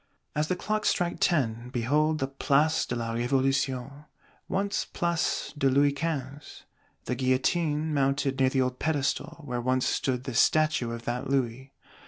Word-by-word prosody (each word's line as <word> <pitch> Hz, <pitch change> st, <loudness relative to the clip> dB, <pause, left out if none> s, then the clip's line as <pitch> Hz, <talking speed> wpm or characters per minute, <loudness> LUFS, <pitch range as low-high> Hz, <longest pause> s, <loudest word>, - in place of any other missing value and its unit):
As 150 Hz, 0 st, +1 dB
the 185 Hz, -, 0 dB
clocks 215 Hz, +3 st, 0 dB
strike 175 Hz, -2 st, 0 dB
ten, 120 Hz, -8 st, +1 dB
behold 150 Hz, +6 st, +1 dB
the 135 Hz, -2 st, -1 dB
Place 145 Hz, +3 st, +1 dB
de -, -, -2 dB
la 115 Hz, -1 st, -3 dB
Révolution, 135 Hz, +2 st, 0 dB, 0.4 s
once 200 Hz, +1 st, 0 dB
Place 170 Hz, -2 st, -1 dB
de 135 Hz, -2 st, +2 dB
Louis 140 Hz, +2 st, +4 dB
Quinze: 145 Hz, -2 st, -5 dB, 0.4 s
the -, -, -1 dB
Guillotine, 150 Hz, +5 st, +1 dB
mounted 135 Hz, -1 st, +1 dB
near 130 Hz, -1 st, +4 dB
the 130 Hz, 0 st, +1 dB
old 125 Hz, 0 st, -1 dB
Pedestal 160 Hz, +2 st, -1 dB
where 125 Hz, -3 st, -3 dB
once 130 Hz, +1 st, +1 dB
stood 125 Hz, -2 st, 0 dB
the 130 Hz, -2 st, -5 dB
Statue 155 Hz, -1 st, +3 dB
of 115 Hz, 0 st, -7 dB
that 125 Hz, +3 st, -3 dB
Louis! 130 Hz, 0 st, -1 dB
135 Hz, 155 wpm, -28 LUFS, 130-155 Hz, 0.4 s, Louis